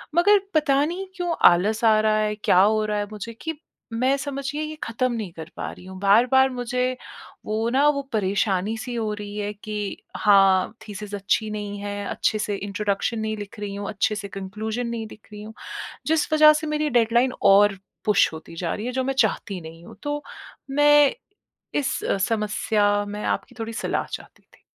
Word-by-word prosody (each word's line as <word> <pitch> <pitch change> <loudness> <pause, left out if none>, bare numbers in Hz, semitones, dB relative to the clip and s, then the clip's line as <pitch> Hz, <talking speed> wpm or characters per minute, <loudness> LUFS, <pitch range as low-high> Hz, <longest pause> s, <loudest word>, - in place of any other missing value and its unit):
मगर 405 +4 +6
पता 285 -2 +3
नहीं 360 +4 -4
क्यों 350 -2 -1 0.2
आलस 210 +6 +1
आ 215 -1 +5
रहा 215 0 +2
है 210 0 0
क्या - - +4
हो 215 +2 +3
रहा 210 0 -1
है 205 - -1
मुझे 215 +2 -7
कि 320 - -3 0.4
मैं 255 +4 +2
समझिए 275 +1 -4
ये 310 0 -4
ख़त्म 250 +2 -1
नहीं 215 -6 -4
कर 160 +1 -9
पा - - -4
रही 180 - -13
हूँ, 190 0 -9
बार-बार 250 +6 +5
मुझे 250 0 -2 0.5
वो 220 +2 -1
ना 285 +2 +5
वो 280 -1 0
परेशानी-सी 205 +3 0
हो 220 -2 -1
रही 210 0 -7
है 205 0 -2
कि 210 -1 -5 0.2
हाँ, 195 -2 +4
थीसिस 205 0 -6
अच्छी 205 +2 0
नहीं 205 -1 -5
है, 205 0 -4
अच्छे 215 - 0
से 205 -1 -1
इंट्रोडक्शन 205 +3 -2
नहीं 215 0 -2
लिख 205 +1 -8
रही 205 -1 -4
हूँ, 200 0 -5
अच्छे 215 +1 0
से 200 -1 -5
कन्क्लूज़न 215 +5 -4
नहीं 230 -1 -4
दिख 215 - -15
रही 210 - -8
हूँ। 220 +1 -9 0.5
जिस 315 0 +1
वजह 305 0 +8
से 310 - -3
मेरी 300 0 0
डेडलाइन 240 +3 +2
और 200 0 +5 0.3
पुश 210 -5 +4
होती 160 +1 -10
जा 170 0 -2
रही 215 +3 -5
है 250 - -2
जो - - -1
मैं 270 +1 -1
चाहती 200 -4 +1
नहीं 165 +1 -11
हूँ। - - -12
तो 290 0 -3 0.5
मैं 290 0 +5 0.6
इस 275 -2 -1 0.3
समस्या 210 -1 +1
में 210 +1 -5
आपकी 250 - -2
थोड़ी 225 0 -4
सलाह - - -2
चाहती - - -9
थी। - - -26
215 Hz, 190 wpm, -24 LUFS, 205-255 Hz, 0.6 s, वजह